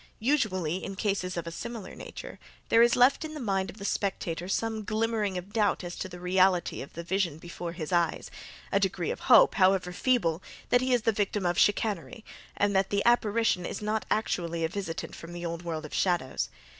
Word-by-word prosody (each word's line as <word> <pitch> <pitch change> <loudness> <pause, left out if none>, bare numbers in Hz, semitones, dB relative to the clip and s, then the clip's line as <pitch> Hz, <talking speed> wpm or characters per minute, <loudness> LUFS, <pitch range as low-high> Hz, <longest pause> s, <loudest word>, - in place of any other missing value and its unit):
Usually, 190 - 0
in 195 - -5
cases 190 -3 -1
of 170 - -3
a 165 - -5
similar 230 +2 -6
nature, - - -9 0.3
there 230 - +6
is 235 0 +5
left 250 +5 +4
in 310 0 -6
the - - -5
mind 195 -6 -1
of 195 - -10
the 200 - -7
spectator 180 -4 -2
some 220 +2 -1
glimmering 215 -2 -1
of 185 +3 -8
doubt 210 -4 +1
as 175 0 -5
to 190 - -4
the 180 0 -9
reality 180 0 +2
of 135 - -9
the 170 - -6
vision 175 -3 -1
before 170 +1 -7
his 165 -2 -6
eyes; 170 -1 0 0.4
a - - +3
degree - - -1
of - - -5
hope, - - +8
however 185 -2 +3
feeble, 180 -8 +1 0.3
that 245 - +4
he 255 0 0
is 245 -3 +3
the 225 - +3
victim 205 -2 -1
of 175 0 +1
chicanery, 210 +1 +1 0.3
and 200 -1 +2
that 190 0 +2
the 200 0 0
apparition 225 -5 +3
is - - -4
not 215 +1 -2
actually 170 -6 -1
a - - -1
visitant 190 -3 -5
from 170 +1 -10
the 175 0 -6
old 170 0 -4
world 160 -3 -4
of 155 - -10
shadows. 165 - 0
190 Hz, 205 wpm, -28 LUFS, 175-220 Hz, 0.4 s, hope